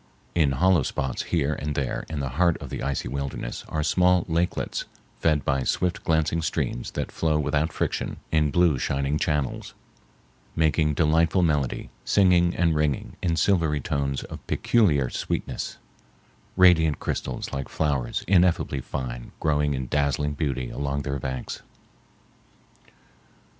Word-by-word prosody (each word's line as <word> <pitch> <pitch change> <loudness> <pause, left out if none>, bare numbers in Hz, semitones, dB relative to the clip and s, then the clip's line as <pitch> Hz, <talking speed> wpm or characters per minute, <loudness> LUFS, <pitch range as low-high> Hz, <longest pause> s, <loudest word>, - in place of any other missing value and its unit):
In 75 -5 +3
hollow 90 +4 +4
spots 65 -1 -2
here 75 -3 +1
and 75 -1 -4
there 65 -3 -2
in 75 -3 -3
the 70 - -2
heart 85 -2 +4
of - - -9
the - - -4
icy 70 -3 -2
wilderness 70 -2 -4
are 75 -1 -1
small 90 +2 +3
lakelets 85 +1 -1 0.3
fed 75 -3 +2
by 70 -1 +1
swift 90 +6 0
glancing 80 0 +1
streams - - -2
that - - -2
flow 80 -2 +1
without 75 +2 0
friction - - -2
in 75 -2 +3
blue 85 -4 +3
shining 70 +3 0
channels, 75 -4 -2 0.8
making 80 -1 +2
delightful 80 +3 +3
melody, 75 -6 0
singing 90 -3 +4
and 85 -2 +2
ringing 75 -3 -1
in 85 -2 +1
silvery 80 -3 +2
tones 70 0 -2
of - - -8
peculiar 80 - +2
sweetness, - - -3 0.8
radiant 85 -5 +5
crystals - - -4
like 70 -1 -4
flowers 70 -6 -1
ineffably 90 -6 +3
fine - - -5
growing 75 -2 +1
in 65 0 -3
dazzling 75 +2 0
beauty 65 -4 -2
along 70 0 -2
their 70 0 -3
banks. 65 -1 -5
75 Hz, 135 wpm, -25 LUFS, 70-85 Hz, 0.8 s, radiant